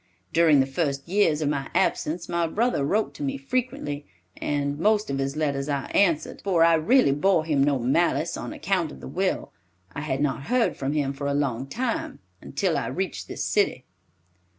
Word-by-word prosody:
During 160 -4 +5
the - - +2
first 140 0 -2
years 170 -5 +2
of 145 - +1
my 140 -2 -2
absence 165 +3 0
my 170 -1 0
brother 220 - 0
wrote 210 +10 0
to - - -11
me 275 -1 -2
frequently, 255 - -3 0.3
and 145 0 -2
most 210 0 +2
of 135 - -2
his 135 +1 -2
letters 140 -2 -1
I 140 -2 -1
answered, 170 -6 +2
for 180 -4 +3
I 165 0 +6
really 165 - +4
bore 160 +3 +2
him 145 -4 +2
no 140 -1 +2
malice 135 +8 +1
on - - -5
account - - -1
of 65 - -11
the 65 - -9
will. - - -2 0.4
I - - -4
had 140 -3 -2
not 140 -1 -1
heard 250 -2 +2
from 135 +2 -2
him 140 -2 0
for 140 +1 -4
a 140 - 0
long 135 -3 -1
time, 235 - -3 0.2
until - - -1
I - - -3
reached - - -3
this - - -4
city." - - +1
150 Hz, 195 wpm, -25 LUFS, 140-185 Hz, 0.4 s, I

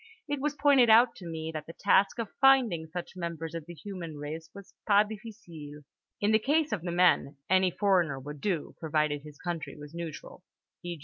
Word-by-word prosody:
It 290 -2 -2
was 295 0 -1
pointed 275 -4 +5
out 235 +2 +6
to 175 - -9
me 160 -1 -5
that 155 -1 -6
the 165 - -10
task 195 +4 +3
of 230 -3 -4
finding 250 -12 +4
such 175 +3 -7
members 170 -2 -5
of 165 -1 -6
the 175 - -9
human 170 -2 -7
race 155 +2 -6
was 200 +1 -13
pas 205 0 +5
difficile: 175 -10 -10 0.4
in 205 +1 +2
the 220 - +5
case 300 +6 +1
of 210 - -1
the 175 0 -4
men, 175 -5 +3
any 185 0 +5
foreigner 180 -7 +1
would 145 +1 -9
do 180 -7 -2
provided 150 -2 0
his 150 0 -12
country 175 -3 -5
was 150 +1 -11
neutral 170 +1 -8 0.4
(e. 175 -1 -5
175 Hz, 195 wpm, -29 LUFS, 160-210 Hz, 0.4 s, out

